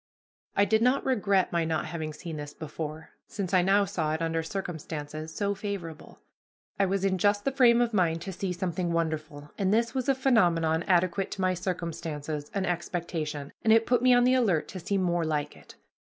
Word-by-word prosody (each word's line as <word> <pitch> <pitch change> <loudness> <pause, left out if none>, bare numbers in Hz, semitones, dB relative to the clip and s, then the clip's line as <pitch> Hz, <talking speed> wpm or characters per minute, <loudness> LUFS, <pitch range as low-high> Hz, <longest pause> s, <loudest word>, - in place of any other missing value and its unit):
I 200 - +4
did 220 +2 +2
not 250 +3 +2
regret 200 -7 +2
my 170 -1 +1
not 160 -1 -1
having 160 -2 -4
seen 155 +1 -7
this 145 0 -7
before, 155 0 -6 0.2
since 195 -3 -4
I 185 - +6
now 195 +3 +3
saw 160 -6 -1
it 160 - -5
under 165 0 0
circumstances 160 -3 -5
so 200 +5 -1
favorable. 195 -6 -7 0.6
I 195 - +3
was 195 +1 0
in 190 -1 +1
just 205 +2 +2
the 275 - +2
frame 245 -3 +5
of 235 -1 0
mind 165 -4 +1
to 190 - -5
see 190 +1 -3
something 175 -1 -2
wonderful, 155 -3 -3
and 195 -1 +2
this 230 +2 +2
was 260 0 -1
a 270 - +4
phenomenon 175 -11 +3
adequate 185 +1 +2
to 195 - -5
my 185 0 +2
circumstances 165 -5 -4
and 195 -1 -1
expectation, 165 -4 -3
and 220 - +4
it 225 0 +5
put 245 -1 +2
me 255 0 +5
on 245 0 +6
the 250 +1 +4
alert 210 -11 +2
to 185 - -6
see 195 +4 -1
more 175 -2 +1
like 150 -2 -2
it. - - -16
180 Hz, 200 wpm, -28 LUFS, 160-200 Hz, 0.6 s, I